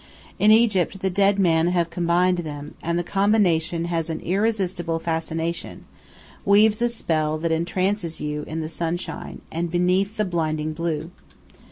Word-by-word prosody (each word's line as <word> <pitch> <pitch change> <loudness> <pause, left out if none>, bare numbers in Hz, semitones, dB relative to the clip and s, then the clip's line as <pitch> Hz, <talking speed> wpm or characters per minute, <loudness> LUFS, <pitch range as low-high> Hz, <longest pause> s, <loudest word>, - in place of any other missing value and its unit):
In 210 - +5
Egypt 210 -4 +3
the 190 - 0
dead 200 +2 +3
men 170 -3 +3
have 175 -1 0
combined 175 +1 +2
them, 150 -3 -6
and 170 +1 -1
the 175 - 0
combination 175 -4 +1
has 165 -1 -2
an 160 - -3
irresistible 185 -4 0
fascination, 165 0 -3 0.6
weaves 210 +2 +4
a 240 - +3
spell 155 -9 0
that 165 +1 -2
entrances 175 +1 -1
you 150 0 -3
in 160 +1 -4
the 155 - -3
sunshine 170 +2 -4
and 170 +1 -2
beneath 180 +4 +1
the 215 - +1
blinding 155 -3 -1
blue. 165 0 -3
170 Hz, 150 wpm, -23 LUFS, 160-195 Hz, 0.6 s, In